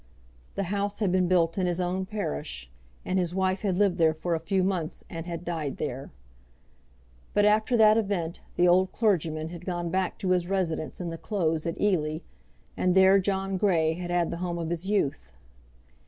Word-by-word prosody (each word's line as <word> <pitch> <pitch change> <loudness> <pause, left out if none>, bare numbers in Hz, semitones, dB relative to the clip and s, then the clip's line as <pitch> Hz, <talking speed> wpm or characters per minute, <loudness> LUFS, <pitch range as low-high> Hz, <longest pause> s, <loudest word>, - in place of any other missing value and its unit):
The 200 - -1
house 200 +2 -2
had 205 -4 0
been 185 -1 +2
built 170 0 +2
in 185 - +1
his 175 0 -1
own 185 +1 -1
parish, 70 - -4 0.3
and 185 +1 0
his 175 -1 -1
wife 190 0 0
had 190 -4 0
lived 195 -3 +2
there 160 -1 +4
for 170 +2 -2
a 165 - 0
few 185 +4 0
months 180 -4 -2
and 165 0 -6
had 170 0 -5
died 160 -5 -3
there. 135 -2 -4 1.3
But 205 - +4
after 215 +3 +3
that 215 0 +6
event 185 -6 -2
the 180 - +4
old 185 +2 +4
clergyman 160 -7 0
had 170 0 -9
gone 175 -2 -3
back 190 0 -1
to 190 -3 -1
his 180 -1 +2
residence 180 -5 -2
in 175 -2 -3
the 165 0 -6
Close 165 -6 -1
at 165 - -4
Ely, 155 -7 +1 0.6
and 180 0 +1
there 190 +1 +6
John 195 0 -1
Grey 170 -5 +2
had 175 +1 -6
had 175 -1 +1
the - - -4
home 175 -1 -3
of 165 -1 -3
his 175 +3 -3
youth. 135 - -1
180 Hz, 195 wpm, -27 LUFS, 165-195 Hz, 1.3 s, that